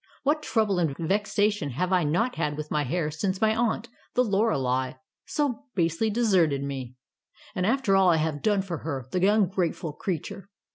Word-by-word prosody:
What 300 Hz, +2 st, +2 dB
trouble 215 Hz, -9 st, +1 dB
and 155 Hz, -5 st, 0 dB
vexation 205 Hz, 0 st, 0 dB
have 180 Hz, +8 st, -1 dB
I 180 Hz, -2 st, +3 dB
not 200 Hz, +12 st, +1 dB
had 150 Hz, -3 st, -2 dB
with 150 Hz, 0 st, -6 dB
my 150 Hz, -1 st, +1 dB
hair 155 Hz, +3 st, -1 dB
since 185 Hz, +4 st, -2 dB
my 220 Hz, 0 st, +3 dB
aunt, 230 Hz, 0 st, 0 dB, 0.3 s
the 250 Hz, -, +4 dB
Lorelei, 135 Hz, -, +1 dB, 0.3 s
so 280 Hz, -2 st, -1 dB
basely 170 Hz, +4 st, +1 dB
deserted 185 Hz, -11 st, +2 dB
me. 130 Hz, -3 st, -5 dB, 0.6 s
And 185 Hz, 0 st, 0 dB
after 230 Hz, -5 st, +2 dB
all 190 Hz, -1 st, +5 dB
I 170 Hz, -, +5 dB
have 155 Hz, -2 st, -1 dB
done 205 Hz, -3 st, +2 dB
for 175 Hz, -5 st, -4 dB
her, 135 Hz, -5 st, -4 dB
the 185 Hz, +1 st, +2 dB
ungrateful 185 Hz, -6 st, 0 dB
creature. 185 Hz, +3 st, -5 dB
185 Hz, 175 wpm, -26 LUFS, 150-215 Hz, 0.6 s, all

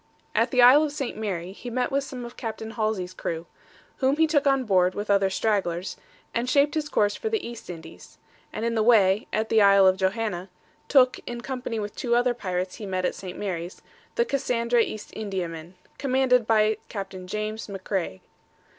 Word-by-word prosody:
At -, -, +2 dB
the 250 Hz, -3 st, +4 dB
Isle 260 Hz, +5 st, +8 dB
of 305 Hz, -2 st, 0 dB
St. 275 Hz, -4 st, -4 dB
Mary, 190 Hz, -5 st, -3 dB
he 245 Hz, +5 st, -8 dB
met 250 Hz, +3 st, -1 dB
with 275 Hz, +1 st, +1 dB
some 255 Hz, -3 st, -7 dB
of 240 Hz, -, -10 dB
Capt. 225 Hz, -3 st, -5 dB
Halsey's 215 Hz, -5 st, -2 dB
crew, 165 Hz, -2 st, -4 dB, 0.5 s
whom 270 Hz, +2 st, +2 dB
he 320 Hz, -, +5 dB
took 295 Hz, -2 st, +2 dB
on 270 Hz, -1 st, +3 dB
board 185 Hz, -4 st, +2 dB
with 205 Hz, 0 st, -2 dB
other 195 Hz, -1 st, +3 dB
stragglers, 190 Hz, -3 st, -1 dB, 0.4 s
and 235 Hz, +2 st, -1 dB
shaped 285 Hz, +1 st, +3 dB
his 305 Hz, -1 st, -2 dB
course 205 Hz, -5 st, +2 dB
for 445 Hz, -, -3 dB
the 440 Hz, -, -2 dB
East 235 Hz, -4 st, -9 dB
Indies, 165 Hz, -2 st, -10 dB, 0.3 s
and 225 Hz, -, -3 dB
in 235 Hz, -, 0 dB
the 225 Hz, -, +1 dB
way, 210 Hz, -3 st, +4 dB
at 220 Hz, +1 st, -1 dB
the 220 Hz, -, +4 dB
island 195 Hz, -2 st, +6 dB
of 185 Hz, -, -14 dB
Johanna, 190 Hz, -1 st, -1 dB, 0.4 s
took, 255 Hz, -3 st, +4 dB
in 240 Hz, 0 st, -5 dB
company 250 Hz, -3 st, -4 dB
with 205 Hz, -1 st, -4 dB
two 235 Hz, -2 st, 0 dB
other 245 Hz, 0 st, +3 dB
pirates 185 Hz, -5 st, -3 dB
he 210 Hz, -, -7 dB
met 185 Hz, -1 st, -1 dB
at -, -, 0 dB
St. 185 Hz, -2 st, -8 dB
Mary's, 180 Hz, -3 st, -5 dB, 0.3 s
the 475 Hz, -, +2 dB
Cassandra 240 Hz, -, +1 dB
East 215 Hz, -1 st, -4 dB
Indiaman, 180 Hz, -5 st, -5 dB, 0.2 s
commanded 255 Hz, -3 st, +2 dB
by 215 Hz, -1 st, +3 dB
Capt. 195 Hz, -2 st, -6 dB
James 215 Hz, +2 st, -4 dB
Macraigh. 190 Hz, -, -3 dB
220 Hz, 190 wpm, -25 LUFS, 190-250 Hz, 0.5 s, Isle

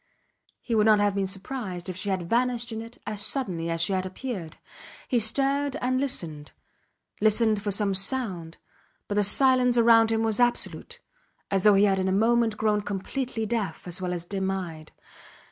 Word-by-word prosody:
He 235 Hz, -, -4 dB
would 215 Hz, -1 st, +3 dB
not 215 Hz, -1 st, +6 dB
have 205 Hz, -1 st, +2 dB
been 195 Hz, -1 st, -1 dB
surprised 195 Hz, -2 st, -6 dB
if 185 Hz, -, -5 dB
she 185 Hz, +3 st, -3 dB
had 190 Hz, -2 st, -1 dB
vanished 240 Hz, +2 st, 0 dB
in 220 Hz, 0 st, -5 dB
it 230 Hz, +1 st, -11 dB
as 210 Hz, -1 st, -1 dB
suddenly 190 Hz, -8 st, -1 dB
as 165 Hz, 0 st, -1 dB
she 195 Hz, -, +1 dB
had 185 Hz, -1 st, 0 dB
appeared. 185 Hz, -3 st, -6 dB, 0.5 s
He 245 Hz, -, +1 dB
stared 275 Hz, +5 st, +1 dB
and 255 Hz, +1 st, -1 dB
listened; 160 Hz, -, -4 dB, 0.7 s
listened 215 Hz, 0 st, +2 dB
for 205 Hz, -, -3 dB
some 200 Hz, 0 st, 0 dB
sound, 190 Hz, -5 st, +1 dB, 0.5 s
but -, -, -3 dB
the 205 Hz, 0 st, +2 dB
silence 250 Hz, +3 st, +4 dB
round 225 Hz, -1 st, +5 dB
him 225 Hz, 0 st, +1 dB
was 220 Hz, -1 st, -1 dB
absolute 240 Hz, 0 st, -1 dB, 0.5 s
as 195 Hz, -1 st, +1 dB
though 210 Hz, -1 st, +7 dB
he 195 Hz, -, +4 dB
had 195 Hz, -2 st, +2 dB
in 190 Hz, -, -1 dB
a -, -, +1 dB
moment 225 Hz, +2 st, +2 dB
grown 210 Hz, -1 st, +1 dB
completely 220 Hz, +4 st, -4 dB
deaf 220 Hz, -4 st, -3 dB
as 180 Hz, +2 st, -3 dB
well 180 Hz, -1 st, -2 dB
as 175 Hz, -1 st, -4 dB
dim 190 Hz, +1 st, -3 dB
eyed. 170 Hz, -5 st, -5 dB
210 Hz, 185 wpm, -26 LUFS, 190-235 Hz, 0.7 s, though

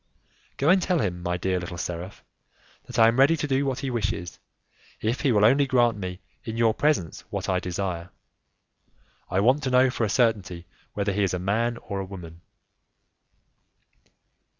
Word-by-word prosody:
"Go 140 Hz, -, +2 dB
and 185 Hz, +1 st, +5 dB
tell 180 Hz, 0 st, +1 dB
him, 90 Hz, -, -2 dB
my 90 Hz, 0 st, -1 dB
dear 95 Hz, +1 st, -1 dB
little 85 Hz, 0 st, -6 dB
seraph, 90 Hz, +2 st, -6 dB, 0.6 s
that -, -, -7 dB
I 115 Hz, -, +7 dB
am 115 Hz, +3 st, +2 dB
ready 145 Hz, +5 st, +5 dB
to 150 Hz, -, -2 dB
do 140 Hz, 0 st, +1 dB
what 130 Hz, -2 st, -2 dB
he 135 Hz, -, -3 dB
wishes, 105 Hz, -6 st, -3 dB, 0.6 s
if 120 Hz, +3 st, -1 dB
he 135 Hz, -, +2 dB
will 105 Hz, -2 st, +4 dB
only 135 Hz, +5 st, +4 dB
grant 120 Hz, -3 st, +3 dB
me 90 Hz, -2 st, -6 dB, 0.2 s
in 110 Hz, 0 st, -5 dB
your 115 Hz, -1 st, +3 dB
presence 145 Hz, -, 0 dB
what -, -, -4 dB
I 90 Hz, -1 st, +1 dB
desire; 90 Hz, -1 st, -4 dB, 1.2 s
I 95 Hz, -, +1 dB
want 130 Hz, +7 st, +3 dB
to 135 Hz, -, -1 dB
know 130 Hz, 0 st, +4 dB
for 120 Hz, -, -2 dB
a 110 Hz, -, +1 dB
certainty 100 Hz, -7 st, 0 dB, 0.3 s
whether 100 Hz, 0 st, 0 dB
he 100 Hz, -, 0 dB
is 95 Hz, -2 st, +1 dB
a -, -, -1 dB
man 110 Hz, +6 st, 0 dB
or 100 Hz, -4 st, -5 dB
a 95 Hz, -, -3 dB
woman." 85 Hz, -3 st, -10 dB
105 Hz, 180 wpm, -25 LUFS, 90-125 Hz, 1.2 s, I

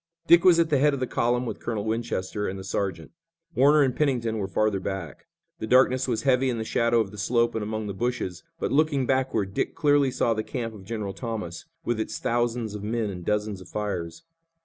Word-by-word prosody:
Dick 170 Hz, 0 st, +6 dB
was 180 Hz, -2 st, +7 dB
at 165 Hz, -1 st, +2 dB
the 145 Hz, -, +4 dB
head 145 Hz, +1 st, +4 dB
of -, -, -5 dB
the 130 Hz, -, 0 dB
column 120 Hz, +1 st, 0 dB
with -, -, -5 dB
Colonel 110 Hz, -3 st, -3 dB
Winchester 110 Hz, -3 st, -2 dB
and 95 Hz, -, -4 dB
the 95 Hz, -, -7 dB
sergeant. 95 Hz, -4 st, -3 dB, 0.4 s
Warner 145 Hz, +2 st, +5 dB
and 130 Hz, -2 st, 0 dB
Pennington 120 Hz, -7 st, 0 dB
were 95 Hz, -, -2 dB
further 105 Hz, 0 st, +1 dB
back. 95 Hz, -4 st, -6 dB, 0.3 s
The 110 Hz, -, -4 dB
darkness 130 Hz, +1 st, +4 dB
was 115 Hz, -3 st, -1 dB
heavy 130 Hz, -1 st, +3 dB
in 120 Hz, -, -1 dB
the 110 Hz, -, -2 dB
shadow 115 Hz, +1 st, +2 dB
of 100 Hz, -3 st, -4 dB
the 105 Hz, -, -9 dB
slope 120 Hz, +3 st, +2 dB
and 110 Hz, -, -2 dB
among 110 Hz, +1 st, -3 dB
the 100 Hz, -, -4 dB
bushes, 115 Hz, -5 st, -3 dB, 0.2 s
but, -, -, -2 dB
looking 145 Hz, -2 st, +2 dB
backward, 130 Hz, -7 st, 0 dB
Dick -, -, -1 dB
clearly 145 Hz, -3 st, +3 dB
saw 120 Hz, -2 st, +1 dB
the 110 Hz, -, -1 dB
camp 115 Hz, 0 st, -4 dB
of 100 Hz, -3 st, -12 dB
General 105 Hz, -2 st, -4 dB
Thomas 105 Hz, -6 st, -5 dB, 0.2 s
with 120 Hz, -2 st, 0 dB
its 110 Hz, -, -3 dB
thousands 120 Hz, -2 st, -1 dB
of 105 Hz, -, -6 dB
men 110 Hz, 0 st, -1 dB
and 90 Hz, -2 st, -7 dB
dozens 105 Hz, 0 st, -1 dB
of 90 Hz, -, -13 dB
fires. 100 Hz, -, -4 dB
115 Hz, 220 wpm, -26 LUFS, 105-130 Hz, 0.4 s, was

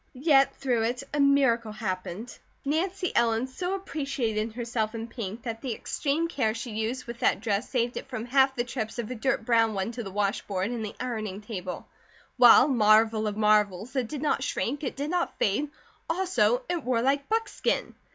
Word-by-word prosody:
Yet, 275 Hz, -1 st, +4 dB
through 250 Hz, -4 st, 0 dB
it, 250 Hz, +3 st, -2 dB
a 295 Hz, -, 0 dB
miracle 265 Hz, -5 st, +3 dB
happened: 210 Hz, +1 st, -5 dB, 0.3 s
Nancy 360 Hz, +5 st, -1 dB
Ellen 230 Hz, 0 st, +2 dB
so 360 Hz, +9 st, -3 dB
appreciated 270 Hz, -, -2 dB
herself 230 Hz, -2 st, -2 dB
in 225 Hz, 0 st, -4 dB
pink 225 Hz, -1 st, -6 dB
that 225 Hz, -2 st, -5 dB
the 250 Hz, -5 st, -3 dB
extreme 305 Hz, +8 st, -1 dB
care 225 Hz, -9 st, 0 dB
she 235 Hz, +1 st, -5 dB
used 220 Hz, +4 st, -3 dB
with 235 Hz, 0 st, -8 dB
that -, -, +2 dB
dress 210 Hz, +1 st, -1 dB
saved 245 Hz, -2 st, 0 dB
it -, -, -6 dB
from 235 Hz, -3 st, -4 dB
half 265 Hz, +2 st, +3 dB
the 240 Hz, -, 0 dB
trips 240 Hz, -2 st, -4 dB
of 235 Hz, 0 st, -4 dB
a -, -, -1 dB
dirt 245 Hz, 0 st, -1 dB
brown 225 Hz, -2 st, +3 dB
one 195 Hz, +3 st, -2 dB
to 240 Hz, 0 st, -5 dB
the 205 Hz, -, -6 dB
wash 200 Hz, +1 st, 0 dB
board 195 Hz, +2 st, -1 dB
and 235 Hz, -2 st, -3 dB
the 210 Hz, -, -6 dB
ironing 215 Hz, -6 st, -3 dB
table; 190 Hz, -4 st, -6 dB, 0.5 s
while, 245 Hz, +2 st, +8 dB
marvel 220 Hz, -3 st, +4 dB
of 205 Hz, 0 st, -3 dB
marvels, 210 Hz, +1 st, +2 dB
it 255 Hz, -3 st, 0 dB
did 295 Hz, +3 st, -5 dB
not 295 Hz, -, +1 dB
shrink, 275 Hz, +2 st, -2 dB
it 265 Hz, -, -3 dB
did 285 Hz, +3 st, -3 dB
not 355 Hz, -1 st, -1 dB
fade, 220 Hz, +9 st, +1 dB, 0.4 s
also 380 Hz, +8 st, +2 dB
it 345 Hz, -4 st, -2 dB
wore 235 Hz, -2 st, +1 dB
like 280 Hz, +2 st, +1 dB
buckskin. 450 Hz, +1 st, -1 dB
235 Hz, 190 wpm, -27 LUFS, 220-275 Hz, 0.5 s, while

